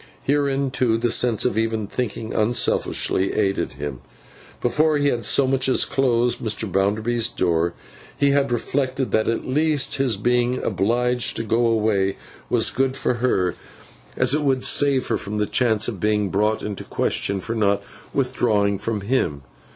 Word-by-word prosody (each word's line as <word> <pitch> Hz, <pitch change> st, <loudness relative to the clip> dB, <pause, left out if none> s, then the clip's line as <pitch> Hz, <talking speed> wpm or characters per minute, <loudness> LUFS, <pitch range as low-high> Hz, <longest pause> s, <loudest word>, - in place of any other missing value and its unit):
Herein, 140 Hz, -1 st, 0 dB
too, 120 Hz, -3 st, +1 dB
the 120 Hz, 0 st, 0 dB
sense 120 Hz, -4 st, +2 dB
of 125 Hz, -3 st, +1 dB
even 110 Hz, -1 st, -1 dB
thinking 110 Hz, 0 st, -4 dB
unselfishly 105 Hz, -3 st, 0 dB
aided 100 Hz, -2 st, 0 dB
him. 70 Hz, -4 st, -6 dB, 0.6 s
Before 150 Hz, +5 st, +2 dB
he 145 Hz, 0 st, +2 dB
had 120 Hz, -5 st, -2 dB
so 140 Hz, -, +4 dB
much 130 Hz, 0 st, +1 dB
as -, -, +2 dB
closed 125 Hz, -3 st, +1 dB
Mr. 110 Hz, 0 st, -2 dB
Bounderby's 110 Hz, +5 st, +1 dB
door, 85 Hz, -3 st, 0 dB, 0.4 s
he 140 Hz, -1 st, +3 dB
had 140 Hz, -2 st, +1 dB
reflected 130 Hz, +2 st, -1 dB
that 110 Hz, 0 st, +1 dB
at 115 Hz, -, -2 dB
least 150 Hz, +1 st, +1 dB
his 130 Hz, -6 st, +1 dB
being 120 Hz, +3 st, +1 dB
obliged 120 Hz, +5 st, 0 dB
to 115 Hz, -, -1 dB
go 115 Hz, +2 st, +1 dB
away 105 Hz, -4 st, +1 dB, 0.3 s
was -, -, +2 dB
good 135 Hz, +1 st, 0 dB
for -, -, 0 dB
her, 95 Hz, -8 st, +1 dB, 0.6 s
as -, -, +3 dB
it 150 Hz, -, +1 dB
would 135 Hz, -3 st, +1 dB
save 140 Hz, -2 st, +2 dB
her 115 Hz, -, -1 dB
from 105 Hz, +1 st, -5 dB
the 105 Hz, -, +1 dB
chance 110 Hz, -2 st, +1 dB
of 110 Hz, -6 st, -4 dB
being 105 Hz, 0 st, +1 dB
brought 105 Hz, +3 st, 0 dB
into 105 Hz, -2 st, -5 dB
question 100 Hz, 0 st, -1 dB
for 115 Hz, +5 st, -4 dB
not 100 Hz, -2 st, +1 dB, 0.3 s
withdrawing 110 Hz, -7 st, +1 dB
from 110 Hz, -1 st, -3 dB
him. 95 Hz, -, -1 dB
115 Hz, 165 wpm, -22 LUFS, 105-130 Hz, 0.6 s, so